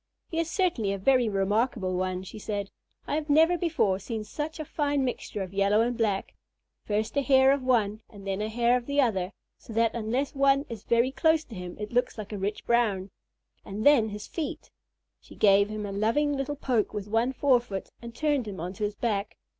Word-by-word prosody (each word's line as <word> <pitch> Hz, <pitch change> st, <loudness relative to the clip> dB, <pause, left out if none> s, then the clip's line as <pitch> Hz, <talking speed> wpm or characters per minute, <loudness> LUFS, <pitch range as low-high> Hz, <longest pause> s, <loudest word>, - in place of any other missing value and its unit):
"He 330 Hz, -, -1 dB
is 330 Hz, 0 st, -1 dB
certainly 330 Hz, -, 0 dB
a -, -, -2 dB
very 250 Hz, +3 st, +3 dB
remarkable 200 Hz, 0 st, 0 dB
one," 185 Hz, 0 st, -2 dB
she 195 Hz, +3 st, -9 dB
said. 200 Hz, -1 st, -4 dB, 0.3 s
"I 305 Hz, +2 st, -1 dB
never 320 Hz, +4 st, +5 dB
before 310 Hz, -, +1 dB
saw 220 Hz, +2 st, -4 dB
such 300 Hz, +9 st, -5 dB
a 310 Hz, -, -4 dB
fine 285 Hz, -2 st, 0 dB
mixture 210 Hz, -5 st, -3 dB
of 185 Hz, 0 st, -9 dB
yellow 200 Hz, +2 st, +3 dB
and 240 Hz, +1 st, 0 dB
black, 210 Hz, -4 st, -1 dB, 0.5 s
first 215 Hz, +3 st, -2 dB
a -, -, +4 dB
hair 265 Hz, -1 st, +5 dB
of 280 Hz, 0 st, +1 dB
one 220 Hz, -4 st, +1 dB
and 200 Hz, -2 st, -13 dB
then 195 Hz, +1 st, -2 dB
a 215 Hz, -, -2 dB
hair 240 Hz, +2 st, +2 dB
of 245 Hz, -, -7 dB
the 285 Hz, 0 st, 0 dB
other, 195 Hz, -8 st, +1 dB, 0.3 s
so 225 Hz, -, -11 dB
that, 230 Hz, +1 st, +2 dB
unless 240 Hz, +5 st, -1 dB
one 275 Hz, 0 st, +3 dB
is 225 Hz, -3 st, -8 dB
very 235 Hz, +2 st, +3 dB
close 320 Hz, +2 st, +2 dB
to 250 Hz, -, -13 dB
him 180 Hz, -1 st, -7 dB
it 210 Hz, +2 st, -6 dB
looks 245 Hz, 0 st, +1 dB
like 215 Hz, -1 st, -7 dB
a -, -, -3 dB
rich 200 Hz, +2 st, -3 dB
brown. 205 Hz, -5 st, +1 dB, 0.5 s
And 205 Hz, +2 st, -5 dB
then 270 Hz, -7 st, +6 dB
his 210 Hz, 0 st, -7 dB
feet!" 325 Hz, -3 st, -5 dB, 0.5 s
She -, -, -16 dB
gave 200 Hz, 0 st, +4 dB
him 215 Hz, -1 st, -4 dB
a 200 Hz, -, -5 dB
loving 230 Hz, +9 st, +1 dB
little 275 Hz, +2 st, -2 dB
poke 245 Hz, -7 st, 0 dB
with 205 Hz, -1 st, -4 dB
one 225 Hz, +4 st, +1 dB
forefoot 245 Hz, -7 st, +1 dB
and 235 Hz, -1 st, -9 dB
turned 290 Hz, -6 st, 0 dB
him 195 Hz, -4 st, -6 dB
onto 180 Hz, +5 st, -5 dB
his 205 Hz, 0 st, -1 dB
back. 210 Hz, -3 st, -2 dB
225 Hz, 210 wpm, -27 LUFS, 205-270 Hz, 0.5 s, then